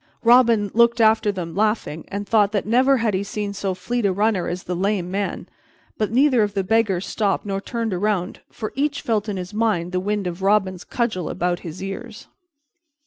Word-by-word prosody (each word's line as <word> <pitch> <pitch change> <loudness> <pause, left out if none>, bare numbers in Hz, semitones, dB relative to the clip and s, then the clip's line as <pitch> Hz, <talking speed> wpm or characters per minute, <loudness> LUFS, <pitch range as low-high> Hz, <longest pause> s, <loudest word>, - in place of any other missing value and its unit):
Robin 230 -4 +5
looked 235 +1 +4
after 220 -1 +4
them, 175 -4 -6
laughing, 210 -6 -1
and 200 +1 -5
thought 205 -2 +3
that 205 -3 -1
never 255 +5 +4
had 225 -3 0
he 190 - 0
seen 205 0 -4
so 195 -1 -2
fleet 240 +6 -2
a 200 - +3
runner 205 -1 +1
as 180 +1 -4
the 180 - -3
Lame 185 -1 -1
man; 200 +1 -3 0.5
but 215 - -1
neither 255 0 +4
of 205 -1 -1
the 195 - +1
beggars 200 -2 +1
stopped 205 -2 -1
nor 195 -1 -2
turned 230 -1 -3
around, 185 -1 -1
for 215 - -6
each 290 +2 -1
felt 215 -2 0
in 200 - -3
his 180 +2 -6
mind 210 -6 0
the 185 - 0
wind 205 +1 -2
of 175 +1 -4
Robin's 190 -2 +1
cudgel 220 -8 -2
about 175 0 -1
his 170 +2 -8
ears. 210 +3 -7
205 Hz, 195 wpm, -22 LUFS, 185-225 Hz, 0.5 s, Robin